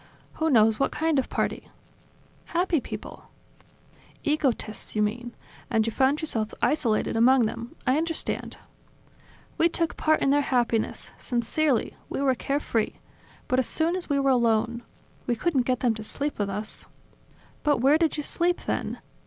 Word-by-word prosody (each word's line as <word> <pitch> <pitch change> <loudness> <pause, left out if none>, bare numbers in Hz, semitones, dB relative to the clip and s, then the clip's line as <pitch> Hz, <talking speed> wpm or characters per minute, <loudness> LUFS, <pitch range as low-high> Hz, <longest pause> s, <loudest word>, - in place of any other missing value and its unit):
"Who 320 - +3
knows 220 -5 +4
what 275 - +2
kind 320 -2 +1
of 265 - -2
party!" - - -2 0.8
"Happy 345 -3 +1
people.. - - -8 0.5
." - - -29
"Egotists, 250 -9 -2
you 210 - +3
mean, 240 +3 -3 0.3
and 225 -4 +2
you 230 - -1
found 270 +5 +2
yourselves 225 -9 -2
isolated 235 -10 +1
among 245 +2 +5
them, 230 +2 -5
I 255 +3 +3
understand.. 330 0 -2 0.5
." - - -28
"We 335 - +5
took 335 0 -1
part 310 0 +2
in 275 - +3
their 290 +1 +4
happiness, 240 -4 0
sincerely, 245 +2 0 0.2
we - - -3
were 275 -1 +3
carefree. 255 -3 -1 0.5
But 255 - +2
as 260 - +1
soon 330 +2 +1
as 365 -3 -5
we 285 -1 +2
were 275 -1 +3
alone... 235 -1 +2 0.5
We 240 - +1
couldn't 265 -1 0
get 255 -1 0
them 245 -3 +3
to 220 0 -7
sleep 285 +5 -4
with 205 -1 0
us.. 210 +2 -5 0.3
." - - -30
"But 295 -1 +2
where 275 +6 +4
did 325 -2 +1
you 295 - -2
sleep, 345 +4 0
then? - - -2
260 Hz, 170 wpm, -26 LUFS, 230-305 Hz, 0.8 s, among